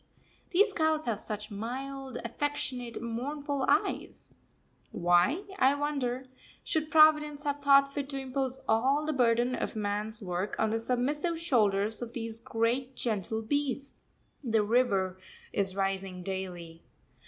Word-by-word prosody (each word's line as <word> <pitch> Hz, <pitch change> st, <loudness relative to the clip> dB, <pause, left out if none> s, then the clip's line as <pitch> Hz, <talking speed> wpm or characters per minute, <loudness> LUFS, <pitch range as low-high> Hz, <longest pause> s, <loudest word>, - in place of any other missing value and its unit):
These 400 Hz, +3 st, +4 dB
cows 315 Hz, -3 st, +1 dB
have 225 Hz, -4 st, -1 dB
such 210 Hz, 0 st, -6 dB
mild, 260 Hz, +4 st, -5 dB
affectionate, 250 Hz, -2 st, -3 dB
mournful 280 Hz, +4 st, -2 dB
eyes; -, -, 0 dB, 0.6 s
why, 175 Hz, -, +3 dB, 0.2 s
I 265 Hz, +2 st, +5 dB
wonder, 270 Hz, -3 st, -2 dB, 0.4 s
should 310 Hz, -1 st, -1 dB
Providence 300 Hz, -2 st, +5 dB
have 290 Hz, -1 st, -1 dB
thought 275 Hz, 0 st, +5 dB
fit 280 Hz, -1 st, -3 dB
to 275 Hz, -1 st, -3 dB
impose 265 Hz, 0 st, -2 dB
all 265 Hz, +7 st, +2 dB
the 310 Hz, -, 0 dB
burden 245 Hz, -1 st, +3 dB
of -, -, -3 dB
man's 210 Hz, +1 st, -1 dB
work 185 Hz, -1 st, -3 dB
on 220 Hz, -1 st, +1 dB
the 225 Hz, -, 0 dB
submissive 290 Hz, +8 st, -1 dB
shoulders 215 Hz, -8 st, +2 dB
of 240 Hz, -1 st, -6 dB
these 225 Hz, -1 st, -5 dB
great, 240 Hz, +3 st, -1 dB
gentle 220 Hz, -1 st, -2 dB
beasts? 280 Hz, +2 st, -1 dB, 0.5 s
The 225 Hz, -4 st, +2 dB
river 200 Hz, -5 st, +1 dB, 0.3 s
is 195 Hz, -2 st, 0 dB
rising 195 Hz, -2 st, -2 dB
daily. 175 Hz, -3 st, -5 dB
245 Hz, 130 wpm, -30 LUFS, 210-285 Hz, 0.6 s, I